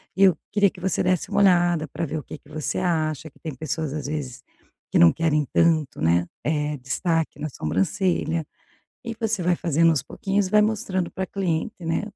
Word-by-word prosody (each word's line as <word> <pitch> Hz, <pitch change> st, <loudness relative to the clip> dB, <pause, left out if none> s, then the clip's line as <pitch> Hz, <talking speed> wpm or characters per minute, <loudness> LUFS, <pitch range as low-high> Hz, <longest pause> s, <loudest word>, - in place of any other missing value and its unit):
e 195 Hz, -, +3 dB
eu 185 Hz, -4 st, +6 dB, 0.2 s
queria 205 Hz, -1 st, +4 dB
que 180 Hz, -, -14 dB
você 190 Hz, 0 st, 0 dB
desse 180 Hz, -2 st, 0 dB
uma 205 Hz, -1 st, +1 dB
olhada 175 Hz, -4 st, +4 dB
para 150 Hz, +4 st, -4 dB
ver 155 Hz, +1 st, -4 dB
o 150 Hz, -, -5 dB
que -, -, -9 dB
que -, -, -22 dB
você 155 Hz, -1 st, -3 dB
acha, 160 Hz, -4 st, -1 dB
que -, -, -26 dB
tem 155 Hz, -, -6 dB
pessoas 155 Hz, +2 st, -3 dB
às 150 Hz, -2 st, -4 dB
vezes 140 Hz, -5 st, -4 dB, 0.5 s
que -, -, +2 dB
não 85 Hz, -1 st, +7 dB
querem 155 Hz, -2 st, +1 dB
tanto, 160 Hz, -4 st, +2 dB
né, 85 Hz, +2 st, +2 dB, 0.2 s
eh, 150 Hz, -1 st, -1 dB
destaque 160 Hz, +5 st, -1 dB
na 155 Hz, -, -3 dB
sobrancelha". 155 Hz, -, 0 dB, 0.6 s
E 230 Hz, -2 st, -6 dB
você 220 Hz, -4 st, 0 dB
vai 175 Hz, 0 st, +2 dB
fazendo 165 Hz, -1 st, +3 dB
aos 150 Hz, -6 st, +1 dB
pouquinhos 195 Hz, +6 st, -1 dB
e -, -, -14 dB
vai 210 Hz, -, +5 dB
mostrando 210 Hz, -4 st, 0 dB
para 190 Hz, -, -3 dB
a -, -, -9 dB
cliente, 180 Hz, -6 st, -2 dB
né, 165 Hz, +4 st, 0 dB
165 Hz, 205 wpm, -24 LUFS, 150-185 Hz, 0.6 s, não